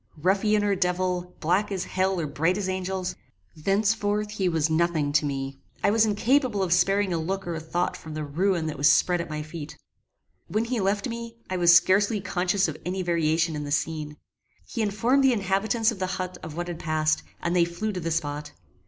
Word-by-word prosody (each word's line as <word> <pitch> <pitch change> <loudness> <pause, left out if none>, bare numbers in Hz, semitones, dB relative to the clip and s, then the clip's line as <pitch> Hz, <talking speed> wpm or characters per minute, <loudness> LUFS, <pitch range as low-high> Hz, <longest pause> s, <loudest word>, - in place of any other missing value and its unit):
Ruffian 205 +6 +2
or 205 -1 +2
devil, 180 -1 -1
black 185 +6 +1
as 190 -2 -2
hell 190 0 0
or 165 - -1
bright 160 +6 0
as 200 -2 -2
angels, 185 0 -2 0.4
thenceforth 205 +4 0
he 195 -3 0
was 160 -3 +1
nothing 160 -2 +1
to 150 0 +3
me. 135 -1 -4 0.2
I - - +4
was 220 0 +4
incapable 225 0 +2
of 175 -2 +2
sparing 195 +1 +2
a 165 - 0
look 195 +4 -3
or 175 - -3
a 160 - -3
thought 175 +3 -2
from 155 -1 -9
the 155 - -3
ruin 170 +4 0
that 155 -3 -4
was 145 +1 +5
spread 175 -1 +3
at 170 - -7
my 150 0 -4
feet. 155 -1 -8 0.7
When 220 +2 0
he 240 0 -1
left 200 +1 0
me, 230 -1 -6 0.2
I 185 - 0
was 175 -1 +6
scarcely 205 +4 +4
conscious 185 0 0
of 155 -1 -5
any 185 +1 -2
variation 165 -1 +1
in 150 - -3
the 145 - -5
scene. 150 0 -2 0.5
He 230 - -4
informed 230 +6 +2
the 265 -1 +5
inhabitants 215 +3 +1
of 215 - -8
the 185 - -1
hut 185 0 -4
of 155 0 -8
what 175 0 -3
had 175 -2 -5
passed, 155 -1 +1 0.2
and 170 +1 -1
they 175 - +5
flew 175 +6 -2
to 185 - -4
the 165 -1 -3
spot. 150 -2 -3
180 Hz, 210 wpm, -26 LUFS, 160-205 Hz, 0.7 s, was